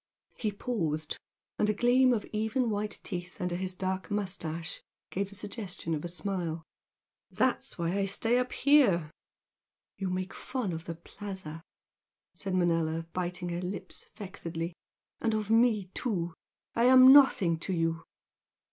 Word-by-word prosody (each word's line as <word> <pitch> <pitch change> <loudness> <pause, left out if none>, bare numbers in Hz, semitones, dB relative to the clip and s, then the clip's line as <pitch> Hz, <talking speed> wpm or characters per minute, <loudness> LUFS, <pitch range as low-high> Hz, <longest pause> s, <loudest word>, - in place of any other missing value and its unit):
he 215 -3 -1
paused, 165 -9 -2 0.4
and 210 - +3
a 210 - +2
gleam 250 +3 +5
of 225 -4 0
even 220 +3 +1
white 210 0 -2
teeth 180 0 -6
under 180 -2 -1
his 185 0 -3
dark 190 0 -2
moustache 175 -5 -3 0.3
gave 195 +1 -1
the 200 - -9
suggestion 200 -5 -5
of 150 - -2
a - - -2
smile 170 -2 -3 0.7
"That's - - 0
why 170 0 0
I 200 -1 +1
stay 225 +5 +2
up 250 0 -1
here." 235 - +4 0.9
"You 190 -2 -1
make 185 +1 -3
fun 245 -9 -3
of 165 0 -6
the 165 - -4
Plaza" 180 -2 -8 0.7
said 190 -2 -3
Manella, 165 -2 +1
biting 180 0 -2
her 175 0 -2
lips 185 +2 -6
vexedly 170 -5 -5 0.5
"And 225 -1 +1
of 215 0 -2
me, 225 -5 +3
too. 175 -9 -2 0.4
I 235 - +3
am 255 +1 +9
nothing 205 - +6
to 190 - -4
you!" 165 -1 0
190 Hz, 145 wpm, -30 LUFS, 170-215 Hz, 0.9 s, am